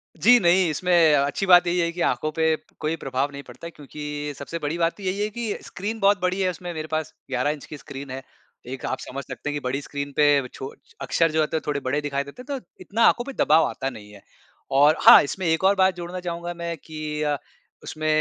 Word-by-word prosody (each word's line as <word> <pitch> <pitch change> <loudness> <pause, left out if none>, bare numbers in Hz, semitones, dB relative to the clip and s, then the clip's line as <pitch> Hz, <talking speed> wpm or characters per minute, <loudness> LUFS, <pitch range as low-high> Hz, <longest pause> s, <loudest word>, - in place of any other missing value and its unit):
जी 245 0 +6
नहीं, 175 0 +4
इसमें 170 0 +3
अच्छी 140 +7 0
बात 180 -1 +7
यही 175 +1 +1
है 170 0 +1
कि 170 0 -6
आँखों 140 +5 0
पे 160 0 +2 0.2
कोई 155 +1 -1
प्रभाव 135 0 -2
नहीं 140 0 -8
पड़ता 130 +7 -10
है, - - -9
क्योंकि 150 0 -6
सबसे 165 +4 -6
बड़ी 150 +2 -3
बात 170 0 +1
तो 200 - -11
यही 190 +1 -2
है 210 - 0
कि 225 -1 -4
स्क्रीन 210 +5 -5
बहुत 195 -2 +3
बड़ी 185 +1 0
है। 185 - +2
उसमें 175 0 -6
मेरे 155 0 -5
पास 155 -1 -2 0.2
11 130 +2 0
इंच 150 -2 -7
की 150 - -9
स्क्रीन 140 -1 -9
है। 130 +1 -5 0.5
एक 130 - -9
आप 130 - -2
समझ 140 +2 -6
सकते 150 - -6
हैं - - -2
कि 145 - -1
बड़ी 130 +3 -2
स्क्रीन 140 0 -5
पे 145 -3 +4
छो 135 +1 -7 0.3
अक्षर 155 +5 +1
जो 160 - 0
होते 155 +1 0
हैं, - - -3
थोड़े 145 -1 0
बड़े 140 +3 -1
दिखाई 140 -1 -2
देते 140 - -11
हैं, 270 +1 -5
तो - - -25 0.2
इतना 210 +5 -3
आँखों 240 - +3
पे 275 - -7
दबाव 155 +2 +5
आता 135 - -3
नहीं 105 -5 -12
है। 100 - -14 0.6
और 145 +2 +6
हाँ, - - +10
इसमें 185 +6 -4
एक 160 +2 +1
और 195 +1 +5
बात 190 -1 +3
जोड़ना 175 +1 -6
चाहूँगा 175 -1 -4
मैं 170 0 -4
कि 155 -1 -6
अ, 145 -1 0 0.5
उसमें 155 0 -4
155 Hz, 245 wpm, -24 LUFS, 140-180 Hz, 0.6 s, हाँ